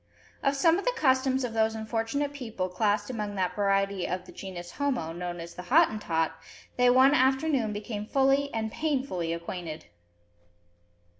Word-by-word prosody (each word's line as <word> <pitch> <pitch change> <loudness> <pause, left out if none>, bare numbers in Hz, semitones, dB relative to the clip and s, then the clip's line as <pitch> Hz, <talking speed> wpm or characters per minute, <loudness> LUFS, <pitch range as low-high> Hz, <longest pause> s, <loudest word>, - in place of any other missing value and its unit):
Of 275 0 +1
some 330 +6 +4
of 400 - -6
the - - +1
customs 260 -1 +2
of 240 -2 -3
those 220 0 +1
unfortunate 225 +6 -2
people 225 -9 -4
classed 205 +4 0
amongst 210 -4 -4
that 185 -2 -1
variety 195 -2 +1
of 180 0 -3
the - - -12
genus 175 -3 -8
homo 260 - -1
known 175 0 -5
as 170 0 -8
the - - -7
"Hottentot," 215 - +2 0.4
they 250 0 +4
one 260 +3 +6
afternoon 265 -3 +2
became 210 0 -5
fully 275 +2 +2
and 220 -1 -2
painfully 260 - -1
acquainted. 170 -1 -5
220 Hz, 155 wpm, -28 LUFS, 185-270 Hz, 0.4 s, one